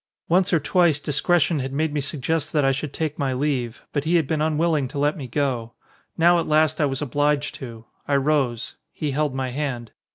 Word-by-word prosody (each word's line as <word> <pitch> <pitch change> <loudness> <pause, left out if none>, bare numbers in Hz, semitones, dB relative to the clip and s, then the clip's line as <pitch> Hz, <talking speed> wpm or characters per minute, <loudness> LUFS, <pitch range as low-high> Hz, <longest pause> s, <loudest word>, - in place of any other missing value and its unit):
Once 180 +2 +3
or 170 - +4
twice 170 -1 +2
discretion 155 +2 +1
had 135 0 -3
made 150 +2 -1
me 150 - 0
suggest 150 +2 -2
that 150 -3 +2
I 135 - +4
should 135 +2 -3
take 155 -1 -3
my 135 -2 0
leave, 130 -4 -2
but 145 - 0
he 165 +3 +1
had 165 -3 +3
been 155 +2 -1
un 155 -1 +1
willing 155 -4 +1
to 135 - -8
let 145 +2 +1
me 140 -7 -6
go. 125 -3 -2 0.4
Now 175 +1 +5
at 165 - -2
last 155 0 +2
I - - +4
was 135 0 -2
obliged 145 +2 0
to. 115 -3 -8 0.2
I 145 - +2
rose. 135 -5 0
He 150 -2 -3
held 145 -1 -1
my 130 -1 -2
hand. 125 -5 -4
145 Hz, 220 wpm, -23 LUFS, 135-155 Hz, 0.4 s, Now